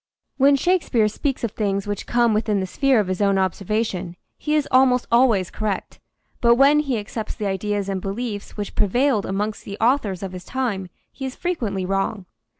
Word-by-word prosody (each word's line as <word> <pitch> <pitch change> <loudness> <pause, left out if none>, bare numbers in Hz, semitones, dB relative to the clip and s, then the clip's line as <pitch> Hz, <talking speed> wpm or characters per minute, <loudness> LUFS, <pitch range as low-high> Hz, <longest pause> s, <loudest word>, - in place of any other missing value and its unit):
When 280 +1 +5
Shakespeare 275 -8 +2
speaks 265 +5 -2
of 230 - -1
things 200 -2 -1
which 205 -1 -4
come 235 -2 +3
within 210 -1 +1
the 190 - -1
sphere 265 +5 +2
of 210 - +1
his 185 +1 -2
own 200 -1 +3
observation 190 -1 -1 0.2
he 300 0 -1
is 300 -2 +1
almost 255 -1 +4
always 230 -7 +3
correct, 210 -3 -3 0.4
but 235 -1 +5
when 280 +4 +5
he 275 -5 0
accepts 215 +1 -5
the 215 - -4
ideas 200 +1 -1
and 195 -1 -2
beliefs 205 +2 -5
which 205 -1 -4
prevailed 240 +2 +1
amongst 205 +2 -2
the 200 0 -7
authors 225 -6 +1
of 190 - -4
his 180 -1 -8
time 210 -7 -3 0.2
he 270 - -9
is 265 -1 -4
frequently 225 - -2
wrong. 195 +1 -1
215 Hz, 185 wpm, -22 LUFS, 195-255 Hz, 0.4 s, When